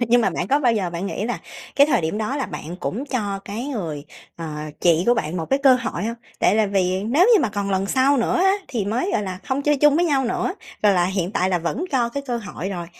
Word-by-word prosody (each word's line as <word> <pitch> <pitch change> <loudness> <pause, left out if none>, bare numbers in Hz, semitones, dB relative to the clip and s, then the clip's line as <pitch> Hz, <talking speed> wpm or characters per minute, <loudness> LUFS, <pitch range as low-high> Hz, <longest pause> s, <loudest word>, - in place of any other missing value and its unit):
Nhưng 240 +1 +5
mà 215 - +2
bạn 175 - -3
có 285 +2 +3
bao 245 -4 +3
giờ 195 -6 -1
bạn 175 +3 -4
nghĩ 200 - -3
là 240 - -2 0.4
cái 280 - +7
thời 300 - +2
điểm 160 +5 -2
đó 220 +6 -2
là 270 - -2
bạn 165 +4 -7
cũng 240 +8 -3
cho 210 -8 -2
cái 215 +5 -5
người, 165 - -4 0.3
ờ, 165 - -6 0.3
chị 170 -1 +4
của 240 - +5
bạn 155 -5 -2
một 165 -2 -3
cái 270 - +3
cơ 265 -2 +7
hội 235 -7 -3
hông? 230 +1 -2 0.2
Tại - - +3
là 215 -1 +3
vì 190 -1 0
nếu 285 - +4
như 415 - +5
mà 230 - +1
còn 200 -1 -3
lần 190 0 0
sau 265 +6 +3
nữa 235 - +1
á 385 +1 +4 0.2
thì 230 -6 -2
mới, 235 - -1
gọi - - +1
là, 185 -2 -5
hông 270 +2 -1
chơi 295 0 +2
chung 295 +1 +4
với 345 - +3
nhau 280 -5 +2
nữa, 255 +9 -1 0.3
rồi 205 -1 +5
là 180 -2 +3
hiện 190 -1 -2
tại 190 -6 +1
là 180 - +2
vẫn 170 - -2
cho 245 -3 +2
cái 280 +4 -4
cơ 245 -2 -1
hội 205 -5 -6
rồi. 175 -3 -5
220 Hz, 275 wpm, -22 LUFS, 185-265 Hz, 0.4 s, cái